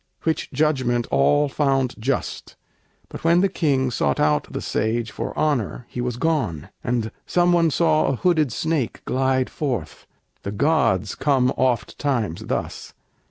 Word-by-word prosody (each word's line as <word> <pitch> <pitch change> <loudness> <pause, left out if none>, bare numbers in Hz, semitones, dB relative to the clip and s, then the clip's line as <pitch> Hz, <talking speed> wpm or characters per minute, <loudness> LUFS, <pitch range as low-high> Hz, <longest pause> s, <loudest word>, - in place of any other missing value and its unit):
Which 160 -1 -1
judgment 130 -5 +1
all 145 - +3
found 135 -3 +1
just; 130 +4 -3 0.5
but - - -9
when 170 +2 +4
the 195 - +4
King 140 -8 0
Sought 70 - 0
out 75 -1 +1
the - - -3
sage 110 0 -1
for - - -4
honor, 135 -6 0
he 125 - -4
was 125 -1 -2
gone; 125 - -1
And 115 -3 -1 0.2
some 175 0 +3
one 170 -1 +4
saw 155 +1 +2
a 135 - +1
hooded 155 -2 +2
snake 155 -2 -2
glide 130 0 +1
forth. 130 -8 -4 0.3
The 100 - -5
gods 115 - +1
come 130 -3 +2
oft 125 -3 0
times 120 - -1
thus! - - -4
130 Hz, 150 wpm, -22 LUFS, 115-155 Hz, 0.5 s, when